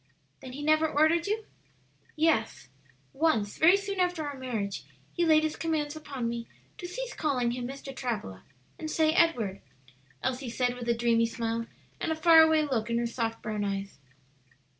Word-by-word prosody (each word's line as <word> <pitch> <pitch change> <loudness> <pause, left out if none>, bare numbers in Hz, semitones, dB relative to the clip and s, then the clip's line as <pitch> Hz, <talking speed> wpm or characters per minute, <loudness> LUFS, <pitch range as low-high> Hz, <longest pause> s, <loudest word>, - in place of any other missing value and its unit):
"Then 255 - -9
he 290 +2 -6
never 310 +1 +3
ordered 315 +4 +3
you?" 430 +1 -1 0.7
"Yes, 305 - +1 0.4
once 270 -9 +1
very 350 +5 +7
soon 400 -1 -4
after 355 -3 0
our 285 - -5
marriage 225 - -4 0.3
he 345 - 0
laid 310 -1 +5
his 310 -1 -1
commands 310 -2 -2
upon 280 -6 -4
me 235 0 -4 0.3
to 355 - -5
cease - - -5
calling 255 -6 0
him 245 0 -4
Mr. 275 0 -8
Travilla 210 - -4 0.4
and 315 - -4
say 315 0 +2
Edward," 235 - +2 0.6
Elsie 260 0 -2
said, 245 +1 0
with 245 -1 -6
a 235 - +3
dreamy 230 -1 +2
smile 230 0 -3 0.3
and - - -1
a - - +1
far 320 0 +7
away 315 -1 +4
look 240 -6 -1
in 235 - +1
her 235 - 0
soft 230 -1 -3
brown 215 -2 -2
eyes. 195 -4 -4
270 Hz, 175 wpm, -29 LUFS, 230-315 Hz, 0.7 s, very